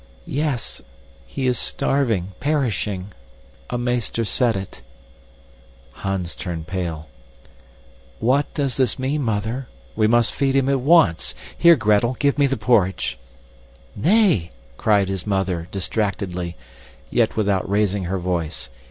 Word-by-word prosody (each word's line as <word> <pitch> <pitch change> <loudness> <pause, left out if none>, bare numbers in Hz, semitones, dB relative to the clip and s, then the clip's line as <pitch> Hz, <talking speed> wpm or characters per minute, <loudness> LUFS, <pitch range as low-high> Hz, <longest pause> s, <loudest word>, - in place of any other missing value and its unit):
"Yes. 140 -5 -2 0.5
He 135 - -4
is 125 -2 +1
starving 115 -10 0
perishing. 110 -9 -1 0.6
A 120 - -2
meester 120 -2 -1
said 115 0 +1
it." 95 -1 -8 1.1
Hans 95 +1 -4
turned 80 -3 -5
pale. 85 -4 -4 1.1
"What 130 +5 +2
does 140 -4 -1
this 130 -2 +2
mean, 135 +3 -1
Mother? 115 +2 -2 0.3
We 110 -1 +3
must 120 +1 +3
feed 135 -1 +1
him 135 0 +3
at 135 -1 +2
once. 135 - +3 0.2
Here, 170 -1 +7
Gretel, 110 0 +2
give 140 0 +1
me 140 - +5
the 135 -1 -1
porridge." 95 - +1 0.8
"Nay!" 170 - +3 0.3
cried 100 - +2
his 95 0 -4
mother, 95 -4 -1
distractedly, 95 -3 -2 0.6
yet - - +2
without 100 -4 0
raising 100 -1 +1
her 95 +2 -1
voice. 85 -6 -3
110 Hz, 125 wpm, -22 LUFS, 95-130 Hz, 1.1 s, Here